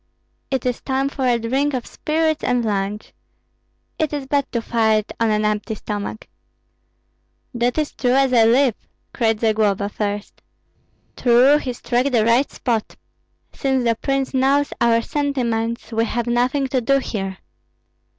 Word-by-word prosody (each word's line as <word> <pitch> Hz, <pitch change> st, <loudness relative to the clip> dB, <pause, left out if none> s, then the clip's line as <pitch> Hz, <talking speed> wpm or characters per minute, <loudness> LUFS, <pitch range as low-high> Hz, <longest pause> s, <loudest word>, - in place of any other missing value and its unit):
It 265 Hz, -2 st, -2 dB
is 250 Hz, -1 st, -1 dB
time 270 Hz, 0 st, -1 dB
for 265 Hz, -2 st, -2 dB
a 240 Hz, -1 st, +3 dB
drink 265 Hz, +5 st, 0 dB
of 245 Hz, -, -3 dB
spirits 315 Hz, 0 st, -1 dB
and 245 Hz, -2 st, +1 dB
lunch. 205 Hz, 0 st, -3 dB, 0.9 s
It 310 Hz, -2 st, 0 dB
is 285 Hz, -2 st, -3 dB
bad 280 Hz, 0 st, -1 dB
to 235 Hz, -, 0 dB
fight 220 Hz, -2 st, +1 dB
on 230 Hz, -1 st, +2 dB
an 215 Hz, 0 st, +1 dB
empty 210 Hz, +1 st, -1 dB
stomach." 205 Hz, -, -5 dB, 1.3 s
"That 245 Hz, +2 st, 0 dB
is 305 Hz, -1 st, 0 dB
as -, -, -27 dB
true 250 Hz, -1 st, +1 dB
as 270 Hz, -1 st, +3 dB
I 230 Hz, -2 st, +6 dB
live!" 250 Hz, +2 st, +4 dB, 0.4 s
cried 225 Hz, -3 st, 0 dB
Zagloba, 210 Hz, -3 st, +1 dB
first. 205 Hz, 0 st, -4 dB, 0.7 s
"True, 255 Hz, +4 st, +5 dB
he 260 Hz, -, -4 dB
struck 245 Hz, +2 st, 0 dB
the 235 Hz, -5 st, +2 dB
right 235 Hz, +4 st, +3 dB
spot. 230 Hz, -4 st, -2 dB, 0.6 s
Since 265 Hz, -2 st, 0 dB
the 230 Hz, -1 st, +3 dB
prince 270 Hz, +4 st, -2 dB
knows 275 Hz, +2 st, +2 dB
our 230 Hz, -1 st, +3 dB
sentiments, 235 Hz, -6 st, -2 dB
we 225 Hz, 0 st, +1 dB
have 235 Hz, 0 st, -2 dB
nothing 250 Hz, +4 st, +1 dB
to 255 Hz, -1 st, 0 dB
do 275 Hz, +4 st, +3 dB
here!" 195 Hz, -7 st, -4 dB
240 Hz, 155 wpm, -21 LUFS, 225-270 Hz, 1.3 s, I